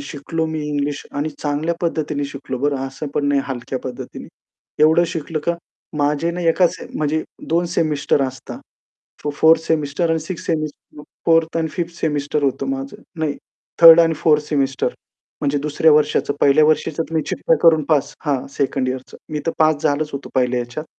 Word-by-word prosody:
शिकलो 160 Hz, +2 st, -4 dB
मी 160 Hz, -1 st, -3 dB
इंग्लिश 145 Hz, 0 st, -2 dB
आणि 145 Hz, +2 st, -2 dB
चांगल्या 150 Hz, +3 st, -2 dB
पद्धतीने 155 Hz, -4 st, -1 dB
शिकलो 140 Hz, -2 st, -6 dB
बरं 145 Hz, +1 st, 0 dB
असं 135 Hz, +3 st, -7 dB
पण 145 Hz, -, 0 dB
नाही 140 Hz, -1 st, +3 dB
हलक्या 130 Hz, 0 st, -4 dB
पद्धतीने. 125 Hz, -1 st, -7 dB, 0.6 s
एवढं 160 Hz, +3 st, +5 dB
शिकलं 165 Hz, -2 st, -4 dB
का? 170 Hz, -, +1 dB, 0.4 s
माझे 150 Hz, +3 st, +1 dB
ना 175 Hz, +1 st, -5 dB
एका 180 Hz, +2 st, +4 dB
सेम -, -, -9 dB
म्हणजे 155 Hz, +1 st, 0 dB, 0.3 s
2 170 Hz, +2 st, +2 dB
सेमिस्टर 150 Hz, -3 st, +1 dB
असतात. 130 Hz, 0 st, -5 dB, 0.7 s
तो 150 Hz, -, 0 dB
4th 160 Hz, +1 st, +5 dB
सेमिस्टर 160 Hz, +1 st, 0 dB
आणि 165 Hz, -, +2 dB
6th 170 Hz, +3 st, -7 dB
सेमिस्टर, 155 Hz, -2 st, -4 dB, 0.2 s
4th 165 Hz, 0 st, +3 dB
आणि 160 Hz, -, 0 dB
5th 170 Hz, +1 st, -4 dB
सेमिस्टर 145 Hz, -1 st, -1 dB
होतं 135 Hz, 0 st, 0 dB
माझं, 135 Hz, 0 st, -5 dB, 0.2 s
नाही 150 Hz, -2 st, -1 dB, 0.5 s
3rd 165 Hz, 0 st, +11 dB
आणि 165 Hz, -1 st, +3 dB
4th 150 Hz, -1 st, +3 dB
सेमिस्टर 135 Hz, -3 st, 0 dB, 0.5 s
म्हणजे 145 Hz, 0 st, 0 dB
दुसऱ्या 150 Hz, +2 st, +2 dB
वर्षाचं 150 Hz, -1 st, +2 dB
पहिल्या 140 Hz, +2 st, +5 dB
वर्षीचं 155 Hz, +1 st, +1 dB
तुम्ही 160 Hz, -1 st, 0 dB
चिठ्या 165 Hz, -, +1 dB
करून 160 Hz, -2 st, +6 dB
पास 150 Hz, -3 st, +1 dB
हां, 140 Hz, -3 st, 0 dB
सेकंड 135 Hz, -1 st, -1 dB
यिअरचं 130 Hz, 0 st, -6 dB, 0.2 s
मी 150 Hz, -, -2 dB
तर 165 Hz, -, +1 dB
पास 155 Hz, -1 st, +3 dB
झालंच 150 Hz, 0 st, +1 dB
होतो 140 Hz, 0 st, -6 dB
पहिल्या 125 Hz, -1 st, +1 dB
ह्याच्यात. 120 Hz, +6 st, -6 dB
150 Hz, 170 wpm, -20 LUFS, 140-160 Hz, 0.7 s, 3rd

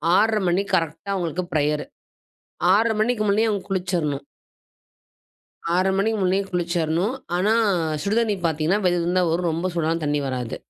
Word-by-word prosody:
6-1/2 220 Hz, +1 st, +3 dB
மணிக்கு 190 Hz, +3 st, 0 dB
கரெக்ட்டா 165 Hz, +4 st, -2 dB
அவங்களுக்கு 180 Hz, -1 st, -2 dB
ப்ரையர். 150 Hz, 0 st, 0 dB, 0.9 s
6:30 220 Hz, +2 st, +3 dB
மணிக்கு 230 Hz, -1 st, 0 dB
முன்னேயே 220 Hz, +3 st, +3 dB
அவங்க 200 Hz, -3 st, -2 dB
குளிச்சரனும். 175 Hz, -7 st, -1 dB, 1.5 s
6:30 185 Hz, +1 st, +2 dB
மணிக்கு 220 Hz, +2 st, +1 dB
முன்னேயே 190 Hz, +2 st, +1 dB
குளிச்சிடணும். 175 Hz, +4 st, 0 dB, 0.2 s
ஆனா, 200 Hz, +4 st, +2 dB, 0.5 s
சுடுதண்ணி 215 Hz, 0 st, +1 dB
பார்த்தீங்கன்னா 160 Hz, +6 st, +1 dB
வெது 175 Hz, 0 st, +3 dB
வெதுன்னு 175 Hz, +2 st, 0 dB
தான் 170 Hz, -2 st, +1 dB
வரும் 175 Hz, 0 st, 0 dB
ரொம்ப 170 Hz, +3 st, -2 dB
சூடான 165 Hz, 0 st, 0 dB
தண்ணி 145 Hz, 0 st, 0 dB
வராது. 125 Hz, -3 st, -3 dB
180 Hz, 140 wpm, -23 LUFS, 160-200 Hz, 1.5 s, 6-1/2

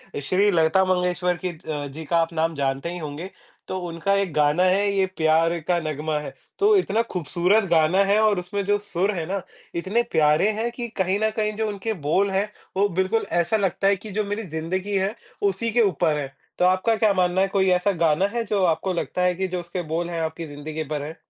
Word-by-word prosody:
ल -, -, -2 dB
श्री 185 Hz, +8 st, +2 dB
लता 165 Hz, +2 st, +3 dB
मंगेश्वर 180 Hz, -1 st, 0 dB
की -, -, +1 dB
अ, 155 Hz, -4 st, -5 dB
जी 155 Hz, +3 st, -8 dB
का 170 Hz, +3 st, +1 dB
आप 165 Hz, 0 st, +1 dB
नाम 160 Hz, 0 st, 0 dB
जानते 135 Hz, +3 st, -1 dB
ही 180 Hz, -, -5 dB
होंगे, 155 Hz, +3 st, -6 dB, 0.4 s
तो 185 Hz, -, -3 dB
उनका 170 Hz, +4 st, -1 dB
एक 195 Hz, -5 st, 0 dB
गाना 150 Hz, +4 st, +3 dB
है 195 Hz, +2 st, +3 dB
ये 190 Hz, -1 st, +3 dB
प्यार 165 Hz, +1 st, +3 dB
का 175 Hz, -1 st, +2 dB
नग्मा 155 Hz, -1 st, -2 dB
है, 150 Hz, -, -7 dB, 0.3 s
तो 415 Hz, +1 st, +5 dB
इतना 225 Hz, -, +1 dB
खूबसूरत 180 Hz, +5 st, +1 dB
गाना 170 Hz, +4 st, +4 dB
है 200 Hz, +2 st, +3 dB
और 210 Hz, -3 st, +3 dB
उसमें 200 Hz, +3 st, -3 dB
जो 205 Hz, 0 st, +2 dB
सुर 200 Hz, -1 st, -1 dB
हैं 160 Hz, -, -2 dB
ना, 195 Hz, 0 st, -2 dB, 0.3 s
इतने 195 Hz, +8 st, 0 dB
प्यारे 150 Hz, +6 st, +3 dB
हैं 235 Hz, +1 st, -1 dB
कि 240 Hz, 0 st, -5 dB
कहीं 190 Hz, +1 st, +1 dB
न 220 Hz, -, +3 dB
कहीं 215 Hz, -1 st, 0 dB
जो 220 Hz, 0 st, -1 dB
उनके 210 Hz, +2 st, -3 dB
बोल 195 Hz, +5 st, +2 dB
हैं, 200 Hz, +2 st, 0 dB, 0.3 s
वो 200 Hz, +1 st, +4 dB
बिल्कुल 190 Hz, +5 st, 0 dB, 0.2 s
ऐसा 195 Hz, +6 st, +1 dB
लगता 195 Hz, 0 st, 0 dB
है 200 Hz, -, +4 dB
कि 210 Hz, +3 st, -10 dB
जो 210 Hz, +2 st, 0 dB
मेरी 205 Hz, +2 st, -3 dB
ज़िंदगी 185 Hz, +6 st, -3 dB
है 195 Hz, +4 st, -1 dB, 0.3 s
उसी 205 Hz, +3 st, 0 dB
के 240 Hz, +1 st, +3 dB
ऊपर 160 Hz, -6 st, +2 dB
हैं। 135 Hz, -2 st, -5 dB, 0.3 s
तो 180 Hz, -, +4 dB
आपका 185 Hz, +5 st, +3 dB
क्या 215 Hz, -2 st, +3 dB
मानना 180 Hz, 0 st, +2 dB
है, 195 Hz, -, +3 dB
कोई 195 Hz, -1 st, +1 dB
ऐसा 180 Hz, +3 st, +2 dB
गाना 165 Hz, 0 st, +2 dB
है 235 Hz, -1 st, 0 dB
जो 200 Hz, -2 st, 0 dB
आपको 180 Hz, +3 st, 0 dB
लगता 180 Hz, +1 st, -2 dB
है 180 Hz, -1 st, +2 dB
कि 190 Hz, +1 st, -1 dB
जो 180 Hz, -1 st, -3 dB
उसके 175 Hz, +1 st, -5 dB
बोल 170 Hz, +1 st, -1 dB
हैं, 165 Hz, -1 st, -3 dB
आपकी 160 Hz, +1 st, -4 dB
ज़िंदगी 150 Hz, +2 st, -5 dB
पर 145 Hz, -, -2 dB
हैं? 155 Hz, +3 st, -7 dB
185 Hz, 230 wpm, -23 LUFS, 165-200 Hz, 0.4 s, तो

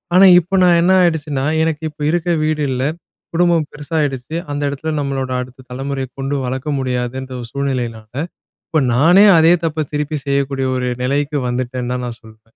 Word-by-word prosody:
ஆனா, 190 Hz, +2 st, +8 dB
இப்ப 180 Hz, +3 st, -1 dB
நான் 175 Hz, -1 st, +5 dB
என்ன 175 Hz, +2 st, +3 dB
ஆயிடுச்சுன்னா, 150 Hz, -5 st, 0 dB, 0.2 s
எனக்கு 160 Hz, -1 st, -2 dB
இப்ப 150 Hz, -, -16 dB
இருக்க 175 Hz, 0 st, -1 dB, 0.2 s
வீடு 155 Hz, -1 st, 0 dB
இல்ல. 130 Hz, 0 st, -1 dB, 0.5 s
குடும்பம் 170 Hz, -2 st, +2 dB
பெருசாயிடுச்சு. 150 Hz, -2 st, -3 dB, 0.2 s
அந்த 145 Hz, 0 st, -3 dB
இடத்துல 145 Hz, +3 st, -4 dB
நம்மளோட 135 Hz, -2 st, -2 dB
அடுத்த 130 Hz, +1 st, -11 dB
தலைமுறைய 135 Hz, +1 st, -3 dB
கொண்டு 135 Hz, +1 st, -2 dB
வளக்க 130 Hz, +4 st, -3 dB
முடியாதுன்ற 130 Hz, 0 st, -3 dB
ஒரு 120 Hz, -, -8 dB
சூழ்நிலையினால, 125 Hz, -6 st, -3 dB, 0.6 s
இப்ப 155 Hz, -, +2 dB
நானே 170 Hz, -, +6 dB
அதே 165 Hz, +2 st, +6 dB
தப்ப 155 Hz, -1 st, -1 dB
திருப்பி 150 Hz, +1 st, -2 dB
செய்யக்கூடிய 140 Hz, -1 st, 0 dB
ஒரு 125 Hz, 0 st, -1 dB
நிலைக்கு 145 Hz, +3 st, 0 dB
வந்துட்டேந்தான் 125 Hz, 0 st, -3 dB
தான் 125 Hz, 0 st, -3 dB
நான் 120 Hz, -1 st, -7 dB
சொல்வேன். 110 Hz, 0 st, -19 dB
140 Hz, 165 wpm, -18 LUFS, 130-155 Hz, 0.6 s, ஆனா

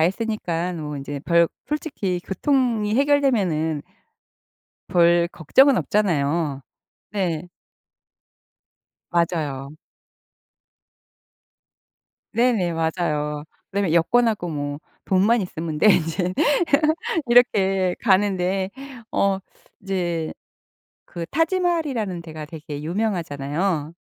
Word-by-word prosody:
했으니깐 180 Hz, -2 st, -1 dB
뭐 150 Hz, -1 st, -5 dB
인제 140 Hz, +1 st, -5 dB
별 170 Hz, -1 st, +4 dB, 0.2 s
솔직히 265 Hz, -, -2 dB
교통이 230 Hz, -, +1 dB
해결되면은 215 Hz, -, +2 dB, 1.1 s
별 170 Hz, 0 st, +4 dB
걱정은 260 Hz, -, +4 dB
없잖아요. 160 Hz, -8 st, 0 dB, 0.5 s
네. 180 Hz, -4 st, -2 dB, 1.6 s
맞아요. 155 Hz, -5 st, -1 dB, 2.6 s
네네. 230 Hz, -8 st, +2 dB
맞아요. 155 Hz, -3 st, -1 dB, 0.3 s
그다음에 195 Hz, -4 st, 0 dB
여권하고 210 Hz, +2 st, +2 dB
뭐 145 Hz, -2 st, -4 dB, 0.3 s
돈만 200 Hz, +4 st, +3 dB
있으면 160 Hz, -3 st, -5 dB
돼. 215 Hz, -, +5 dB
인제 175 Hz, +2 st, 0 dB, 1.0 s
이렇게 195 Hz, -7 st, +4 dB
가는데 190 Hz, -2 st, +1 dB, 0.4 s
어 195 Hz, -1 st, +1 dB, 0.4 s
이제 175 Hz, -4 st, -2 dB, 0.7 s
그 170 Hz, -1 st, -6 dB
타지마할이라는 320 Hz, -, 0 dB
데가 155 Hz, -2 st, -8 dB
되게 150 Hz, -2 st, -8 dB
유명하잖아요. 165 Hz, -3 st, -2 dB
180 Hz, 200 characters per minute, -23 LUFS, 160-210 Hz, 2.6 s, 돼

